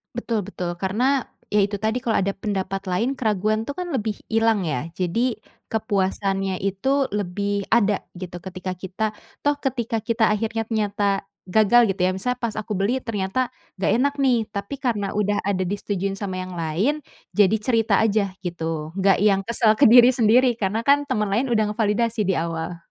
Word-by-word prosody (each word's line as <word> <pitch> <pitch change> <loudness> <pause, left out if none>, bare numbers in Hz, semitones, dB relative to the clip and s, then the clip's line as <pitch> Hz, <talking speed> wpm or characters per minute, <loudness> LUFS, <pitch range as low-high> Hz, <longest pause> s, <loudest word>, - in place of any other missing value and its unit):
Betul 230 -4 -2
betul. 180 -3 -5
Karena, 245 +9 +1 0.2
ya 210 - +2
itu 205 -1 -3
tadi 220 +2 0
kalau 225 -4 +2
ada 195 +1 -1
pendapat 195 -1 -3
lain 220 +9 -1
keraguan 215 -1 0
tuh 285 - -4
kan 360 +4 -5
lebih 215 -3 -3
hilang 225 -1 +2
ya, 150 -1 -2
jadi 220 +6 -1 0.3
kepuasannya 195 -3 -1
itu 260 +9 0
lebih 200 +1 -2
ada 210 -3 +3
gitu 180 -1 -8
ketika 185 0 -5
kita, 190 +4 -4 0.4
toh 290 0 +1
ketika 245 -5 -2
kita 230 -1 +2
akhirnya 225 +1 -2
ternyata 205 -3 0 0.2
gagal 220 +5 +5
gitu 195 - -4
ya, - - +2
misalnya 250 +6 -2
pas 225 -2 -1
aku 215 0 -6
beli 220 +7 0
ternyata 225 +2 -1 0.3
nggak 195 - +2
enak 280 +2 +2
nih, 260 -3 +4 0.2
tapi 200 +5 -4
karena 235 -7 -1
udah 205 0 +1
ada 185 -2 0
disetujui 195 0 -2
sama 195 -2 -4
yang 185 - -9
lain, 165 - +1 0.4
jadi 210 +1 +4
cerita 225 -1 +1
aja 200 -3 0
gitu, 165 -3 -4
nggak 195 -1 +4
yang 200 -2 +4
kesel 230 -1 +3
ke 285 - +8
diri 245 +2 +8
sendiri 240 +1 +4
karena 215 +3 -1
kan 285 0 +3
temen 210 -5 0
lain 235 +7 +2
udah 215 -2 +2
ngevalidasi 220 +1 0
di 190 - +2
awal. 165 +1 -3
210 Hz, 175 wpm, -23 LUFS, 195-230 Hz, 0.4 s, ke